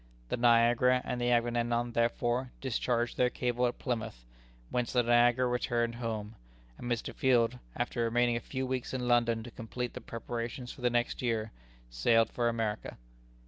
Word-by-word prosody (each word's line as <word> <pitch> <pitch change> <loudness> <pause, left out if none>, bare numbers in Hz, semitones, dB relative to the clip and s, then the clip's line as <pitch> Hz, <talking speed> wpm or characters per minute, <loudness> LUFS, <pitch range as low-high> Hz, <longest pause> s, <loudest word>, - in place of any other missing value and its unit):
The - - 0
Niagara 120 +1 +4
and 125 - -3
the 120 - +1
Agamemnon 120 0 +1
therefore 120 +2 0
discharged 120 -2 -1
their 125 - +3
cable 125 0 0
at 120 - -4
Plymouth, 110 - -4 0.5
whence 125 -1 -1
the 125 -1 +3
Niagara 120 +1 +4
returned 120 -1 0
home; 110 -3 -4 0.5
and 120 - -4
Mr. 120 -1 -2
Field, 125 -1 +2 0.2
after 120 0 -1
remaining 120 +1 +2
a - - 0
few 130 +2 -4
weeks 130 0 -3
in 125 -1 -2
London 120 -2 +2
to 120 - -9
complete 125 +1 -5
the 125 - -7
preparations 115 +2 -5
for - - -12
the 125 - +3
next 120 0 0
year, 110 -3 -1 0.4
sailed 115 - +3
for 120 -1 +1
America. 110 -2 -3
120 Hz, 165 wpm, -31 LUFS, 115-125 Hz, 0.5 s, Niagara